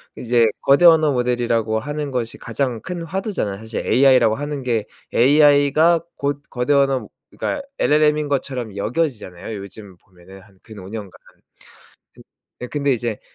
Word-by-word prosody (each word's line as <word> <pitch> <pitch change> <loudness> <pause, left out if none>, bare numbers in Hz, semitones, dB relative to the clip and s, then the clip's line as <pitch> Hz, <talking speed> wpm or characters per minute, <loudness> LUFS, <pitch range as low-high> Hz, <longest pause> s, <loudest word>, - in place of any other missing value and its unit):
이제 120 -1 +2
거대 140 +6 +4
언어 160 -3 +6
모델이라고 120 -3 0
하는 145 +4 -4
것이 120 -3 -3
가장 120 -1 -3
큰 180 -2 -6
화두잖아요. 170 - -3
사실 110 +2 -6
AI라고 125 -4 +4
하는 145 0 -5
게 115 -4 -1 0.3
AI가 145 +4 +4 0.2
곧 145 0 -3
거대 125 +3 0
언어 135 -5 +2 0.2
그러니까 290 - -4 0.2
LLM인 150 0 +2
것처럼 125 -6 -3
여겨지잖아요 110 - -3
요즘 100 -1 -11
보면은 90 +1 -17
한 95 0 -22
근 110 -2 -12
5 95 - -10
년간. 105 -3 -7 1.5
그 125 - -6
근데 145 -2 0
이제 115 -3 -3
125 Hz, 320 characters per minute, -20 LUFS, 110-145 Hz, 1.5 s, 언어